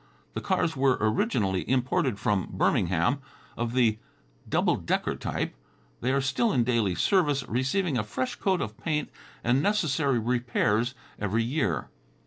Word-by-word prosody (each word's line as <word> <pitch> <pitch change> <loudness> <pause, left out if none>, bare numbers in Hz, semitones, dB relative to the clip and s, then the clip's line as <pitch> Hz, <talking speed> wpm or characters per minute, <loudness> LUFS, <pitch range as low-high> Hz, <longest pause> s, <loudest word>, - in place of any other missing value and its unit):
The - - -3
cars 160 - 0
were 135 -1 +3
originally 110 - +1
imported 125 -5 +1
from 100 -3 0
Birmingham, 90 - +1 0.4
of 120 0 -2
the 115 -4 +3 0.5
double - - +2
decker - - -1
type. - - -3 0.5
They 125 - 0
are 135 +1 +2
still 140 - +1
in 125 - +3
daily 115 -6 +1
service, 145 - +2
receiving 135 - 0
a - - 0
fresh 130 +4 -3
coat 190 -2 0
of 105 0 -5
paint 150 -2 -2 0.3
and 125 +3 +3
necessary 155 - +1
repairs 120 0 +1 0.2
every 105 +3 0
year. 115 - -1
125 Hz, 140 wpm, -27 LUFS, 110-140 Hz, 0.5 s, were